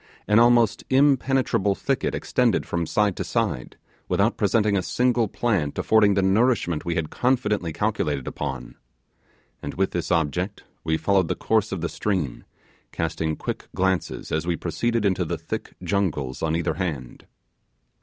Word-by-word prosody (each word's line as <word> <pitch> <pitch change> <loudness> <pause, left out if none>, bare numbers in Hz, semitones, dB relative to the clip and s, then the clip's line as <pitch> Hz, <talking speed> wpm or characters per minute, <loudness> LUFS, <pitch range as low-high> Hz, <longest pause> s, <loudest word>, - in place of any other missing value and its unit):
An 105 +1 +5
almost 120 -2 +4
impenetrable 135 -7 +2
thicket - - -1
extended - - +1
from 85 -2 -2
side 105 0 +1
to - - -2
side, 60 - -2 0.3
without - - +2
presenting 105 -2 +2
a 95 - +2
single 120 +3 +1
plant 100 -10 -1
affording 105 -2 +4
the 100 - +2
nourishment 95 -5 +2
we 85 -1 -2
had 80 -2 -2
confidently 105 -9 0
calculated 75 - -1
upon; 65 -4 -5 0.9
and - - -6
with - - 0
this - - -3
object, 90 +6 -1 0.2
we 80 -1 +1
followed 95 -2 +2
the - - -1
course 110 -1 +1
of 95 - -3
the 85 - 0
stream, 90 -10 -2 0.5
casting 80 -1 -2
quick - - -5
glances 95 -1 -1
as 80 +2 -1
we 85 - +1
proceeded 115 +7 -1
into 95 -2 +2
the - - -3
thick - - -6
jungles 85 -9 -1
on 80 0 0
each 85 - -1
hand. 80 -8 -4
95 Hz, 155 wpm, -24 LUFS, 80-110 Hz, 0.9 s, An